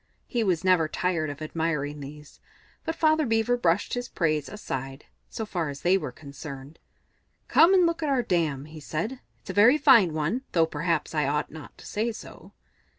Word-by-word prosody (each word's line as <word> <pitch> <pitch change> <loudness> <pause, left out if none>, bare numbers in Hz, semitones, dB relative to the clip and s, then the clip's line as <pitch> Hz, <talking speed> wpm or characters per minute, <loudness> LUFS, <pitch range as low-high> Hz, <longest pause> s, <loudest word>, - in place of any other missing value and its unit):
He 235 -2 -1
was 180 -4 0
never 180 -4 +4
tired 165 -1 -1
of 145 +2 -7
admiring 155 -2 -2
these, 150 +1 -11 0.5
but 325 - -2
Father 310 0 +3
Beaver 225 -1 +1
brushed 180 -5 +1
his 245 0 -3
praise 155 -4 0
aside, 135 -9 -6 0.2
so 220 - -5
far 175 -7 -2
as 140 -1 -7
they 180 +2 +3
were 185 -9 -2
concerned. 140 +1 -10 0.7
"Come 350 +4 +6
and 365 -2 +5
look 335 0 0
at 305 - -1
our 265 -3 +2
dam," 160 - 0
he 155 +1 -11
said. 170 - -4 0.2
"It's - - -7
a - - -8
very 230 +8 +6
fine 240 - +6
one, 160 +11 -1
though 165 -2 +4
perhaps 160 0 -2
I 150 -3 +1
ought 150 +1 -1
not 155 0 -11
to - - -14
say 225 +3 -1
so." 215 - -12
165 Hz, 190 wpm, -26 LUFS, 150-225 Hz, 0.7 s, Come